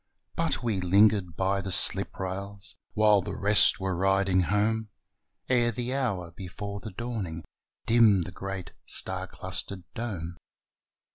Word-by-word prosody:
But -, -, -1 dB
we 110 Hz, -5 st, -1 dB
lingered 100 Hz, -1 st, +3 dB
by 95 Hz, +1 st, 0 dB
the 95 Hz, -, -5 dB
sliprails 95 Hz, +3 st, 0 dB, 0.2 s
While 105 Hz, -2 st, +4 dB
the -, -, -6 dB
rest 105 Hz, +2 st, +4 dB
were 95 Hz, -1 st, -2 dB
riding 95 Hz, +1 st, +2 dB
home, 105 Hz, +3 st, 0 dB, 0.6 s
Ere 120 Hz, -2 st, +3 dB
the 120 Hz, +3 st, -3 dB
hour 100 Hz, -11 st, -2 dB
before 100 Hz, +3 st, -7 dB
the 110 Hz, -, -8 dB
dawning 100 Hz, -7 st, -5 dB, 0.4 s
Dimmed 110 Hz, -5 st, +4 dB
the 85 Hz, -, -8 dB
great 95 Hz, 0 st, -6 dB, 0.2 s
star -, -, +2 dB
clustered 95 Hz, -2 st, -3 dB
dome. 90 Hz, -8 st, -5 dB
100 Hz, 130 wpm, -27 LUFS, 95-110 Hz, 0.6 s, While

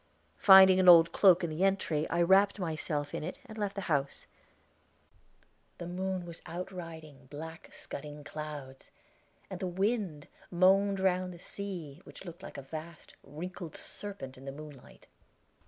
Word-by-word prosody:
Finding 190 Hz, -1 st, +8 dB
an 185 Hz, -1 st, +6 dB
old 165 Hz, -1 st, +8 dB
cloak 185 Hz, -2 st, +5 dB
in 170 Hz, -, -2 dB
the 160 Hz, +4 st, -2 dB
entry, 170 Hz, -6 st, 0 dB
I 170 Hz, +1 st, +2 dB
wrapped 195 Hz, +4 st, +4 dB
myself 155 Hz, -5 st, -3 dB
in -, -, -4 dB
it 160 Hz, -, -5 dB
and 220 Hz, -4 st, -11 dB
left 205 Hz, -2 st, -3 dB
the 200 Hz, -, -3 dB
house. 140 Hz, -6 st, -2 dB, 1.5 s
The 175 Hz, -, -7 dB
moon 185 Hz, +1 st, -3 dB
was 170 Hz, -1 st, -7 dB
out 180 Hz, +3 st, -6 dB
riding 160 Hz, -6 st, -10 dB
black, 160 Hz, +4 st, -9 dB
scudding 150 Hz, +1 st, -8 dB
clouds, 145 Hz, -3 st, -8 dB, 0.6 s
and 190 Hz, -2 st, -7 dB
the 190 Hz, -, -2 dB
wind 190 Hz, -4 st, -2 dB, 0.2 s
moaned 195 Hz, +2 st, +3 dB
round 185 Hz, -1 st, +1 dB
the 175 Hz, -, -10 dB
sea, 175 Hz, -5 st, -7 dB
which -, -, -13 dB
looked 170 Hz, -1 st, -10 dB
like -, -, -9 dB
a 140 Hz, -, -7 dB
vast, 155 Hz, +3 st, -9 dB
wrinkled 175 Hz, +2 st, -8 dB
serpent 135 Hz, -11 st, -7 dB
in 135 Hz, -, -13 dB
the 135 Hz, -, -5 dB
moonlight. 145 Hz, -2 st, -12 dB
170 Hz, 155 wpm, -31 LUFS, 150-190 Hz, 1.5 s, Finding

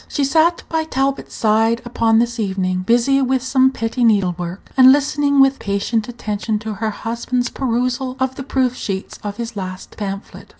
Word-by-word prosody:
She 285 Hz, -, -1 dB
sat 320 Hz, +5 st, +2 dB
by 320 Hz, -1 st, -1 dB
Talbot's 275 Hz, -2 st, -2 dB
side 225 Hz, +2 st, +2 dB
upon 230 Hz, -2 st, +2 dB
this 235 Hz, +1 st, 0 dB
evening, 190 Hz, -3 st, -1 dB
busy 240 Hz, +7 st, +2 dB
with 260 Hz, -1 st, +1 dB
some 260 Hz, 0 st, +3 dB
petty 240 Hz, -1 st, -2 dB
needle 200 Hz, -6 st, +3 dB
work, 175 Hz, +2 st, -7 dB
and 260 Hz, 0 st, +8 dB
listening 285 Hz, 0 st, +2 dB
with 270 Hz, 0 st, +4 dB
patient 205 Hz, +3 st, -1 dB
attention 215 Hz, -2 st, -3 dB
to 215 Hz, 0 st, -5 dB
her 220 Hz, +2 st, -2 dB
husband's 235 Hz, +3 st, -2 dB
perusal 255 Hz, +1 st, -2 dB
of 260 Hz, 0 st, 0 dB
the 270 Hz, -, -8 dB
proof 260 Hz, -2 st, 0 dB
sheets 195 Hz, -5 st, -5 dB
of 205 Hz, -1 st, -5 dB
his 235 Hz, -1 st, -5 dB
last 185 Hz, -1 st, -7 dB
pamphlet. 195 Hz, -1 st, -6 dB
235 Hz, 175 wpm, -19 LUFS, 210-265 Hz, -, and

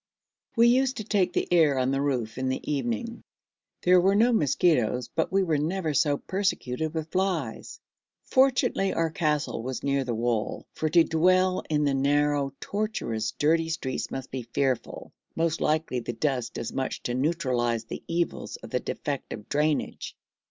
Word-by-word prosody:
We 235 Hz, 0 st, +6 dB
used 260 Hz, +2 st, +3 dB
to 215 Hz, -, -3 dB
take 200 Hz, -3 st, +1 dB
the -, -, -1 dB
air 155 Hz, -5 st, +4 dB
on 130 Hz, 0 st, +1 dB
the 135 Hz, 0 st, 0 dB
roof 125 Hz, -5 st, -1 dB
in 130 Hz, 0 st, -1 dB
the 130 Hz, -, -3 dB
evening; 120 Hz, -6 st, -3 dB, 0.6 s
there 180 Hz, 0 st, +6 dB
were 195 Hz, +2 st, +3 dB
no 235 Hz, +4 st, +4 dB
mosquitos, 130 Hz, -, +2 dB
but 160 Hz, -, 0 dB
we 195 Hz, 0 st, +3 dB
were 160 Hz, -5 st, +1 dB
never 160 Hz, +1 st, -1 dB
so 145 Hz, 0 st, +2 dB
persecuted 160 Hz, -6 st, -2 dB
with 160 Hz, 0 st, -4 dB
flies. 180 Hz, -, -2 dB, 0.4 s
Fortunately 260 Hz, -7 st, +2 dB
our 165 Hz, -1 st, +1 dB
castle 150 Hz, -7 st, -1 dB
was 130 Hz, +2 st, -5 dB
near 140 Hz, -1 st, +1 dB
the 120 Hz, -3 st, -2 dB
wall, 115 Hz, -1 st, -1 dB
for 155 Hz, -, -1 dB
to 170 Hz, +1 st, +6 dB
dwell 185 Hz, +3 st, +3 dB
in 150 Hz, -1 st, +1 dB
the 140 Hz, -1 st, +2 dB
narrow, 145 Hz, 0 st, +2 dB
tortuous, 160 Hz, -, -2 dB
dirty 160 Hz, +2 st, +2 dB
streets 150 Hz, -5 st, -3 dB
must 135 Hz, -1 st, -6 dB
be 130 Hz, -, -3 dB
fearful 120 Hz, +1 st, -2 dB, 0.2 s
most 165 Hz, 0 st, 0 dB
likely 155 Hz, -4 st, 0 dB
the 120 Hz, 0 st, -5 dB
dust 130 Hz, -2 st, -2 dB
does 115 Hz, -, -4 dB
much 130 Hz, -, -3 dB
to 120 Hz, -, -2 dB
neutralise 125 Hz, -5 st, 0 dB
the 115 Hz, -, -7 dB
evils 170 Hz, 0 st, -2 dB
of -, -, -11 dB
the -, -, +1 dB
defective 105 Hz, -, -5 dB
drainage. 150 Hz, +1 st, -1 dB
150 Hz, 165 wpm, -27 LUFS, 130-175 Hz, 0.6 s, We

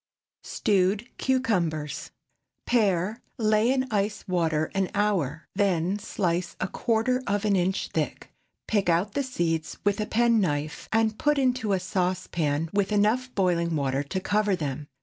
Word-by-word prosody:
STEWED 200 Hz, +3 st, +1 dB
CUCUMBERS. 180 Hz, -, 0 dB, 0.6 s
Pare, 210 Hz, -3 st, +1 dB, 0.2 s
lay 215 Hz, +1 st, +3 dB
in 265 Hz, -1 st, +1 dB
ice 210 Hz, 0 st, -1 dB
water 160 Hz, -4 st, 0 dB
an 195 Hz, -1 st, 0 dB
hour; 175 Hz, -8 st, 0 dB
then, 190 Hz, -1 st, +1 dB
slice 180 Hz, -3 st, -2 dB
a -, -, -1 dB
quarter 235 Hz, +5 st, 0 dB
of 205 Hz, +1 st, 0 dB
an 205 Hz, -2 st, +3 dB
inch 185 Hz, +1 st, 0 dB
thick. -, -, -3 dB, 0.4 s
Pick 205 Hz, -4 st, +1 dB
out 175 Hz, +5 st, +1 dB
the 285 Hz, -, 0 dB
seeds 170 Hz, -, -2 dB
with 205 Hz, +1 st, +1 dB
a 210 Hz, -, -2 dB
penknife, 195 Hz, -11 st, +1 dB
and 220 Hz, -1 st, +1 dB
put 295 Hz, 0 st, +2 dB
into 255 Hz, -5 st, +1 dB
a 190 Hz, -, +2 dB
saucepan 180 Hz, -4 st, -1 dB
with 200 Hz, 0 st, +1 dB
enough 215 Hz, +5 st, +2 dB
boiling 170 Hz, -4 st, +1 dB
water 135 Hz, -2 st, 0 dB
to 145 Hz, +7 st, -3 dB
cover 205 Hz, +1 st, +1 dB
them. 150 Hz, -3 st, -4 dB
195 Hz, 145 wpm, -26 LUFS, 170-220 Hz, 0.6 s, lay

